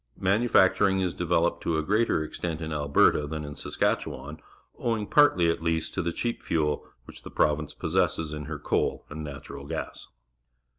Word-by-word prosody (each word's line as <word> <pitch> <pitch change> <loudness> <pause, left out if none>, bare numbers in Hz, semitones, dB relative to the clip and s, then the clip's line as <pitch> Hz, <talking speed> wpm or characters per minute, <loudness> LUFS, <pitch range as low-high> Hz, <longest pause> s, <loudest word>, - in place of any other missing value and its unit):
Manufacturing 100 -1 +3
is 90 -2 0
developed 85 0 +1
to 80 -2 0
a 80 - 0
greater 105 -2 +2
ex - - -8
tent 85 -3 -3
in 80 -1 -4
Alberta 75 0 +3
than 75 0 -4
in 75 0 -7
Saskatchewan, 75 +2 -2 0.4
owing, 115 -3 -1
partly 125 - +4
at 85 - -4
least, 80 -1 -1
to - - -1
the 85 - -1
cheap 120 +7 -3
fuel 75 -3 -1 0.2
which - - -12
the - - -9
province 75 0 0
possesses 80 -2 0
in 75 -1 -5
her 80 -1 -5
coal - - -1
and 80 +1 -6
natural 70 -1 -8
gas. - - -5
80 Hz, 170 wpm, -27 LUFS, 75-95 Hz, 0.4 s, partly